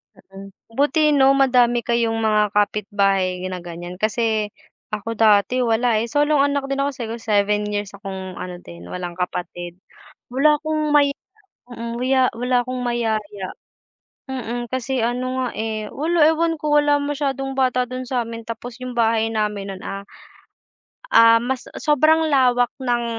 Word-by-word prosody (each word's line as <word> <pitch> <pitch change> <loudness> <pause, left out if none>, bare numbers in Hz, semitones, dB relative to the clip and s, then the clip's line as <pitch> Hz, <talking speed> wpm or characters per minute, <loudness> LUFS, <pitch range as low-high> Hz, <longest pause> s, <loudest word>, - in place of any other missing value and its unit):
Mm, 195 +1 -13 0.2
buti 300 +2 +3
'no 270 -1 +6
madami 250 -3 +4
kayong 230 -1 0
mga 215 -2 +2
kapit-bahay 195 -3 +1
na 185 -1 -6
ganyan. 175 +1 -8
Kasi 215 0 0 0.4
ako 215 +2 -4
dati 220 +3 +3
wala, 230 -1 +2
eh, - - -4
solong 290 -1 +3
anak 280 -1 0
din 275 0 -1
ako. 285 - 0
Siguro 235 -3 -6
7 210 -1 +1
years 205 -1 -4
akong 190 -2 -7
ano 180 0 -7
din 85 - -12
walang 175 -1 -5
kapatid, 175 0 -5 0.5
wala 290 +4 +3
akong 310 -1 -1
maya 285 -1 +4 0.6
mm, 235 0 -6
maya 260 0 +3
wala 250 +2 0
akong 255 0 -4
mayaya. 220 -5 -2 0.8
Mm, 245 -2 -4
kasi 260 -1 -1
ano 255 +2 -2
nga, - - -1
eh, 220 -1 -3
wala 320 +2 +2
ewan 325 +1 +2
ko. 300 0 -1
Wala 290 0 +3
masyadong 275 -2 -2
bata 255 -1 +1
don 255 +1 -6
sa'min 230 -3 -2
tapos 230 +2 -8
yung 250 -1 -6
bahay 225 -1 +2
namin 210 -2 -2
non, 190 -1 -7
ah, 195 0 -5 1.1
ah, 230 - +6
mas 255 +1 -3 0.2
sobrang 310 +2 +3
lawak 250 -3 +3
ng 240 -3 -1
235 Hz, 150 wpm, -21 LUFS, 210-270 Hz, 1.1 s, no